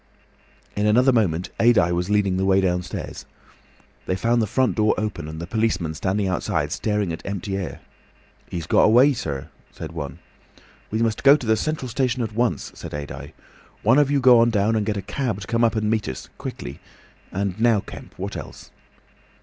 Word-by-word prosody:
In 105 Hz, +1 st, +1 dB
another 125 Hz, +5 st, +4 dB
moment 90 Hz, -7 st, +1 dB
Adye 115 Hz, -8 st, +4 dB
was 90 Hz, +2 st, -1 dB
leading 100 Hz, -3 st, +2 dB
the 95 Hz, -, 0 dB
way 95 Hz, 0 st, +4 dB
downstairs. 90 Hz, -2 st, -3 dB, 0.8 s
They 95 Hz, -, +1 dB
found 115 Hz, +5 st, +1 dB
the 110 Hz, -, 0 dB
front 130 Hz, +5 st, +1 dB
door 110 Hz, -1 st, +2 dB
open 105 Hz, -8 st, -3 dB
and 80 Hz, 0 st, -7 dB
the 85 Hz, -, -4 dB
policemen 95 Hz, -5 st, -1 dB
standing 95 Hz, +4 st, -1 dB
outside 90 Hz, -1 st, -1 dB
staring 105 Hz, -5 st, -1 dB
at 80 Hz, -, -7 dB
empty 100 Hz, 0 st, -4 dB
air. 95 Hz, -3 st, -5 dB, 0.7 s
"He's 85 Hz, -3 st, -4 dB
got -, -, +4 dB
away, 125 Hz, +6 st, +6 dB
sir," 70 Hz, -, -5 dB, 0.2 s
said 80 Hz, -, -8 dB
one. 70 Hz, -5 st, -6 dB, 0.7 s
"We 110 Hz, +2 st, 0 dB
must 110 Hz, -2 st, -1 dB
go 140 Hz, +1 st, +8 dB
to 130 Hz, -, -8 dB
the 110 Hz, 0 st, +3 dB
central 155 Hz, +2 st, -2 dB
station 125 Hz, 0 st, 0 dB
at 110 Hz, -1 st, -4 dB
once," 120 Hz, +1 st, -1 dB
said -, -, -9 dB
Adye. 70 Hz, 0 st, -7 dB, 0.5 s
"One 130 Hz, -, +5 dB
of 145 Hz, -2 st, +3 dB
you 145 Hz, -1 st, +2 dB
go 125 Hz, -2 st, +7 dB
on 115 Hz, +1 st, +5 dB
down 110 Hz, 0 st, +1 dB
and 105 Hz, -1 st, 0 dB
get 105 Hz, -1 st, 0 dB
a 100 Hz, -, -4 dB
cab 125 Hz, -8 st, -2 dB
to -, -, -6 dB
come 115 Hz, +3 st, 0 dB
up 115 Hz, 0 st, +3 dB
and 110 Hz, -1 st, 0 dB
meet 110 Hz, -1 st, 0 dB
us—quickly. 65 Hz, -, -7 dB, 0.5 s
And 100 Hz, 0 st, -2 dB
now, 115 Hz, -3 st, +4 dB
Kemp, -, -, -11 dB
what -, -, -5 dB
else?" -, -, -9 dB
105 Hz, 190 wpm, -23 LUFS, 90-115 Hz, 0.8 s, go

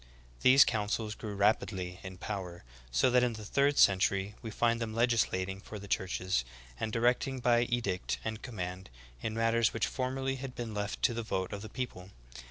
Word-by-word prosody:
These 130 Hz, +2 st, +8 dB
councils 105 Hz, -1 st, -1 dB
grew 110 Hz, -2 st, -6 dB
rapidly 95 Hz, -3 st, +1 dB
in 95 Hz, -1 st, -8 dB
power, 90 Hz, -5 st, -5 dB, 0.3 s
so 125 Hz, -, +3 dB
that 125 Hz, 0 st, +5 dB
in 125 Hz, -1 st, +1 dB
the 110 Hz, -1 st, -8 dB
third 140 Hz, +6 st, +2 dB
century 100 Hz, +1 st, +4 dB
we 115 Hz, -, -5 dB
find 115 Hz, +1 st, +1 dB
them 110 Hz, -1 st, -3 dB
legislating 100 Hz, -5 st, +1 dB
for 105 Hz, -, -8 dB
the 100 Hz, 0 st, -9 dB
churches, 95 Hz, -6 st, 0 dB, 0.4 s
and 110 Hz, -, -2 dB
directing 125 Hz, +3 st, +1 dB
by 120 Hz, -1 st, +3 dB
edict 115 Hz, -7 st, -1 dB
and 110 Hz, 0 st, -3 dB
command, 95 Hz, -6 st, -5 dB, 0.3 s
in 110 Hz, -, -3 dB
matters___which 115 Hz, 0 st, +2 dB
formerly 135 Hz, +1 st, -2 dB
had 130 Hz, -1 st, -7 dB
been 115 Hz, -2 st, -5 dB
left 105 Hz, 0 st, -3 dB
to 120 Hz, -, +4 dB
the 115 Hz, -, -2 dB
vote 95 Hz, -4 st, -2 dB
of 100 Hz, -, -5 dB
the 110 Hz, -, -8 dB
people. 110 Hz, -8 st, -5 dB
110 Hz, 180 wpm, -31 LUFS, 95-120 Hz, 0.4 s, These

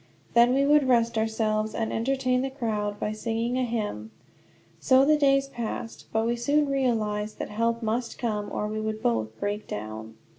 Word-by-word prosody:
Then 240 Hz, +2 st, +5 dB
we 275 Hz, +1 st, +3 dB
would 295 Hz, -1 st, +4 dB
rest 235 Hz, -2 st, +3 dB
ourselves, 220 Hz, -1 st, 0 dB
and 225 Hz, -1 st, -2 dB
entertain 255 Hz, +1 st, +1 dB
the 270 Hz, -, -1 dB
crowd, 215 Hz, -6 st, -3 dB
by 210 Hz, -, -1 dB
singing 230 Hz, +2 st, -2 dB
a -, -, +1 dB
hymn. 210 Hz, -, -3 dB, 0.7 s
So 260 Hz, 0 st, +5 dB
the 305 Hz, +1 st, +5 dB
days 275 Hz, -2 st, +3 dB
passed. 235 Hz, -3 st, -6 dB
But 220 Hz, 0 st, +1 dB
we 235 Hz, +1 st, +1 dB
soon 285 Hz, +5 st, +2 dB
realized 215 Hz, -6 st, 0 dB
that -, -, -5 dB
help 230 Hz, +2 st, -1 dB
must 230 Hz, +2 st, -2 dB
come, 210 Hz, -3 st, -2 dB
or 210 Hz, -, -2 dB
we 215 Hz, 0 st, -3 dB
would 215 Hz, 0 st, -4 dB
both 110 Hz, -2 st, -1 dB
break 205 Hz, +1 st, -3 dB
down. 110 Hz, +1 st, -6 dB
225 Hz, 180 wpm, -26 LUFS, 210-255 Hz, 0.7 s, Then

